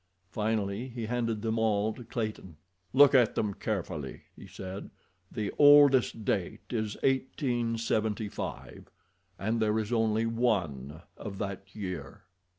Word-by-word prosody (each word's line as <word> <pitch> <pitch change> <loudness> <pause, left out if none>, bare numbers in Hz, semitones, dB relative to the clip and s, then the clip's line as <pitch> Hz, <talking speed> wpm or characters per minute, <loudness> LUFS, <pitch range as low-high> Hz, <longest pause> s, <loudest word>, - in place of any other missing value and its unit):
Finally 105 +2 -1
he 120 -3 -5
handed 115 -2 -1
them 110 0 0
all 110 -1 +1
to 125 - -10
Clayton. 110 -8 -5 0.3
"Look 140 +1 +7
at 125 -4 +4
them 105 -2 0
carefully," 85 -10 -4
he - - -12
said. 95 +1 -7 0.4
"The 105 -2 -3
oldest 145 -6 +6
date 95 -4 -1
is 110 -3 -2
eighteen 125 -3 0
seventy 110 -1 -1
five, - - -7 0.5
and 110 +4 -1
there 110 0 +2
is 110 +2 -2
only 110 -1 +2
one 90 - -1
of 100 -3 -7
that 100 -1 -6
year." 90 -8 -6
110 Hz, 135 wpm, -30 LUFS, 100-115 Hz, 0.5 s, Look